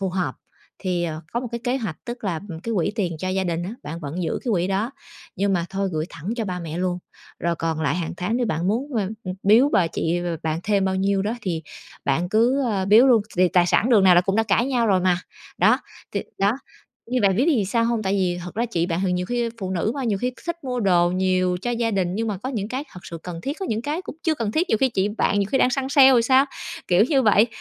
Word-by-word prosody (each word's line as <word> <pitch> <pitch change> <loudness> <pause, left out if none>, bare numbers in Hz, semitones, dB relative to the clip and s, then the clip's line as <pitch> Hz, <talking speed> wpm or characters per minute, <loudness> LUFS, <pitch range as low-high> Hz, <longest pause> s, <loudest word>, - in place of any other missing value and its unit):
phù 195 - 0
hợp, 180 0 -2 0.5
thì, 180 -3 -1
ờ, 160 -2 -4
có 235 - 0
một 250 - -5
cái 235 - -2
kế 250 +2 +1
hoạch, 215 - -4
tức 240 -2 -7
là, 170 -5 -1
ừm, 165 -3 -7
cái 230 +4 -3
quỹ 185 +3 0
tiền 180 -7 -1
cho 185 - -3
gia 190 0 0
đình 170 -1 -1
á, 185 - -4
bạn 165 +3 -6
vẫn 155 +4 -4
giữ 160 - -1
cái 245 - -1
quỹ 180 -3 +1
đó, 195 +5 -1 0.5
nhưng 200 +1 +1
mà 175 -3 +1
thôi 195 0 -1
gửi 155 0 -1
thẳng 165 +3 -8
cho 230 - -1
ba 180 -3 -3
mẹ 165 0 -5
luôn. 180 -1 -1 0.4
Rồi 170 0 -1
còn 165 -1 -2
lại 150 -1 +1
hàng 175 -2 -3
tháng 190 +7 -1
nếu 245 -1 0
bạn 175 -3 -1
muốn, 250 +6 -1
a, 200 -4 0 0.2
ừ, 185 - -3
biếu 225 +8 +5
bà 180 - +4
chị - - -4 0.2
b-b 175 -1 -2
bạn 160 +1 -1
thêm 205 -2 +1
bao 190 0 0
nhiêu 195 0 +1
đó 215 +3 -1
thì 165 -5 -2 0.4
bạn 160 +6 0
cứ, 240 +7 +3
ơ, 205 -6 0
biếu 215 +6 +6
luôn, 235 -5 +5
thì 180 0 +4
tài 175 0 +3
sản 230 +7 +2
đường 210 -5 +5
nào 185 -1 +7
là 175 - +7
cũng 195 +2 -1
đã 225 - +4
cãi 225 +3 +2
nhau 245 -4 +1
rồi 190 -3 +3
mà. 180 -1 +3 0.4
Đó, - - +5 0.3
thì - - -1 0.2
đó, 200 +1 +3 0.6
như 255 0 +1
bạn 195 -3 +3
biết 250 - +3
biết 335 - +4
vì 210 - +1
sao 230 +4 +1
hông? 230 -1 0
Tại 195 -1 0
vì 180 -3 0
thật 180 - -8
ra 235 +2 0
chị 175 -7 -1
bạn 170 0 -1
thì 180 - +1
nhiều 180 0 -1
khi 240 +1 -1
phụ 190 -1 -3
nữ 190 +4 0
mà, 275 -2 -3
nhiều 210 -4 0
khi 250 +4 -1
thích 340 -2 -4
mua 250 -2 -2
đồ 175 -4 +3
nhiều 185 0 +1
cho 240 - -1
gia 235 -1 0
đình 185 -3 0
nhưng 225 +2 -1
mà 205 - -2
có 255 - -5
những 215 -6 -3
cái 260 +5 -3
thật 180 - -10
sự 165 - -8
cần 175 -2 -6
thiết, 280 - -4
có 385 - -2
những 220 +1 -2
cái 300 +7 -3
cũng 360 - -8
chưa 320 - +2
cần 230 -7 -3
thiết. 340 +7 +1
Nhiều 220 - +3
khi 265 - +3
chị 200 -4 0
bạn 205 -1 0
nhiều 200 - +1
khi 265 - +3
đang 250 - +4
săn 265 +1 -1
sale 270 -1 +7
thì 235 - +4
sao, 260 +3 +5 0.4
kiểu 180 +3 +5
như 275 -3 +3
vậy. 215 -1 +5
195 Hz, 285 wpm, -23 LUFS, 180-235 Hz, 0.6 s, nào